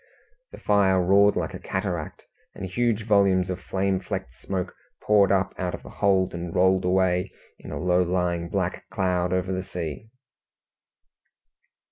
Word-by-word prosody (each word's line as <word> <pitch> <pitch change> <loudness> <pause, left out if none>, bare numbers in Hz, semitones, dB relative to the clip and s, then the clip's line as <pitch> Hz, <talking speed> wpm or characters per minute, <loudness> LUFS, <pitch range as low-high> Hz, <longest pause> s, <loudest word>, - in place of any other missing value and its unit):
The - - -10
fire 100 -2 +3
roared 100 +3 +4
like - - -2
a - - -7
cataract, 95 -5 -4 0.3
and 100 - -6
huge 115 +2 0
volumes 95 -4 +3
of 90 0 -5
flame 95 +1 -1
flecked 95 -1 -5
smoke 95 -2 -4 0.3
poured 100 -2 +4
up 95 0 +1
out 90 -1 -2
of - - -13
the - - -11
hold, 95 -2 +3
and 85 -1 -5
rolled 95 0 +3
away 90 0 +1 0.3
in - - -11
a - - -4
low 90 0 +2
lying 90 -1 -1
black 90 -1 -3
cloud 90 -3 0
over 95 0 0
the 95 0 -1
sea. 90 +3 -6
95 Hz, 155 wpm, -25 LUFS, 90-100 Hz, 0.3 s, roared